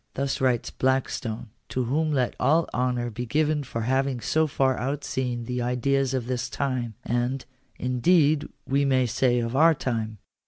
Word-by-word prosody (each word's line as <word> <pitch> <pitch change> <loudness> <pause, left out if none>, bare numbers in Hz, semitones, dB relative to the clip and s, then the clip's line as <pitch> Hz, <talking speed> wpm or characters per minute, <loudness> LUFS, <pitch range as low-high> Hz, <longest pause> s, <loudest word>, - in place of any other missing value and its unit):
Thus 135 0 -1
writes 125 -3 +1
Blackstone, 125 -4 -1 0.2
to 130 - -1
whom 155 +6 0
let 130 -4 0
all 155 +6 +3
honour 125 -1 0
be 120 +3 -5
given 150 +2 +1
for 115 -3 -4
having 130 +2 0
so 155 +6 +1
far 135 -2 +1
outseen 130 -3 -2
the 125 +1 -2
ideas 130 +2 +1
of 125 -3 -2
his 125 0 -2
time; 120 -1 -2
and, 120 +3 -1 0.3
indeed, 145 +4 +3 0.2
we 140 +1 +1
may 130 -2 +3
say 125 +1 +2
of 115 +1 -2
our 160 +3 +6
time. 110 -5 -3
130 Hz, 160 wpm, -26 LUFS, 120-140 Hz, 0.3 s, our